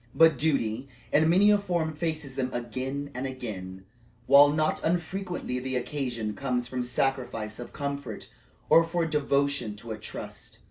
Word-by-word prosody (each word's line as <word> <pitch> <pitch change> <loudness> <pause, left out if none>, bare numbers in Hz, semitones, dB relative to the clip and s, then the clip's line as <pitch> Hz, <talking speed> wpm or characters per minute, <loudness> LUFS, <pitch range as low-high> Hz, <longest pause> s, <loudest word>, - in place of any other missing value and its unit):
But 160 -1 +6
duty 130 -4 0 0.3
in 155 +2 +5
many 195 +5 +6
a 205 - +5
form 175 -5 -1
faces 155 -3 -3
them 130 -1 -2
again 130 +4 -4
and 130 +2 -3
again, 95 -8 -7 0.4
while 140 +2 +8
not 155 +1 0
unfrequently 175 -4 -2
the 130 +1 -3
occasion 125 -4 -2
comes 125 -1 -1
for 125 0 -3
sacrifice 125 -4 -1
of 120 - -7
comfort 140 -2 -5 0.4
or 165 - +7
for 165 0 -1
devotion 140 -6 +1
to 110 +2 -9
a 110 - -5
trust. - - -8
140 Hz, 150 wpm, -28 LUFS, 125-155 Hz, 0.4 s, while